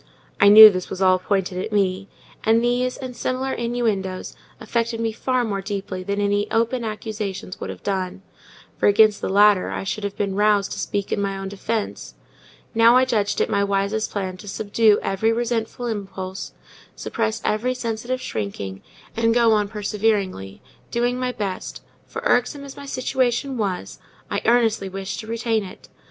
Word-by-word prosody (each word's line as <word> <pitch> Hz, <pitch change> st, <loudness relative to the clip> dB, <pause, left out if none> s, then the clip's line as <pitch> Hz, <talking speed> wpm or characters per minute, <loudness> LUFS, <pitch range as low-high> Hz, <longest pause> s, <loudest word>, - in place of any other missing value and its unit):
I 200 Hz, -, +7 dB
knew 215 Hz, +1 st, +11 dB
this 185 Hz, -1 st, -4 dB
was 185 Hz, -, -5 dB
all 185 Hz, -1 st, +4 dB
pointed 185 Hz, -1 st, -1 dB
at -, -, -6 dB
me; 195 Hz, -1 st, 0 dB, 0.4 s
and 225 Hz, +1 st, +3 dB
these, 250 Hz, +1 st, 0 dB
and 255 Hz, -2 st, -6 dB
all 240 Hz, -, -14 dB
similar 260 Hz, +1 st, -1 dB
innuendoes, 220 Hz, -6 st, -2 dB, 0.2 s
affected 230 Hz, +1 st, -2 dB
me 225 Hz, -1 st, 0 dB
far 255 Hz, +3 st, 0 dB
more 200 Hz, -4 st, -2 dB
deeply 195 Hz, -2 st, -4 dB
than 200 Hz, +2 st, -2 dB
any 205 Hz, +1 st, +1 dB
open 230 Hz, +2 st, 0 dB
accusations 215 Hz, -4 st, -5 dB
would -, -, -5 dB
have -, -, -8 dB
done; 190 Hz, -1 st, -3 dB, 0.6 s
for -, -, +3 dB
against 210 Hz, 0 st, +5 dB
the -, -, -2 dB
latter 205 Hz, -1 st, +4 dB
I -, -, -4 dB
should 205 Hz, +2 st, -4 dB
have 200 Hz, -1 st, -4 dB
been 200 Hz, -1 st, -1 dB
roused 205 Hz, 0 st, +2 dB
to -, -, -5 dB
speak 200 Hz, -1 st, -3 dB
in -, -, 0 dB
my 195 Hz, -1 st, -2 dB
own 195 Hz, 0 st, -5 dB
defence: 210 Hz, +2 st, -4 dB, 0.6 s
now 230 Hz, +1 st, +6 dB
I 260 Hz, -, +4 dB
judged 215 Hz, -5 st, 0 dB
it -, -, +2 dB
my 200 Hz, -1 st, +1 dB
wisest 200 Hz, +2 st, 0 dB
plan 190 Hz, -3 st, -4 dB
to 205 Hz, -, -12 dB
subdue 210 Hz, +1 st, +2 dB
every 195 Hz, +4 st, +1 dB
resentful 235 Hz, 0 st, -2 dB
impulse, 195 Hz, -4 st, -5 dB, 0.4 s
suppress 225 Hz, 0 st, -2 dB
every 250 Hz, +4 st, 0 dB
sensitive 240 Hz, +1 st, -3 dB
shrinking, 100 Hz, -2 st, -5 dB, 0.3 s
and 230 Hz, 0 st, +2 dB
go 235 Hz, -2 st, +5 dB
on 210 Hz, -1 st, +2 dB
perseveringly, 200 Hz, -, -2 dB, 0.3 s
doing 245 Hz, +1 st, 0 dB
my 255 Hz, 0 st, -1 dB
best; 200 Hz, -5 st, -5 dB, 0.2 s
for, -, -, -6 dB
irksome 250 Hz, +4 st, +1 dB
as 275 Hz, -1 st, -9 dB
my 280 Hz, -, -10 dB
situation 260 Hz, 0 st, -1 dB
was, 190 Hz, -, -3 dB, 0.3 s
I -, -, -1 dB
earnestly 225 Hz, -4 st, +2 dB
wished 195 Hz, 0 st, -5 dB
to 220 Hz, -, -8 dB
retain 225 Hz, -1 st, -1 dB
it. 185 Hz, -, -12 dB
210 Hz, 175 wpm, -22 LUFS, 195-230 Hz, 0.6 s, knew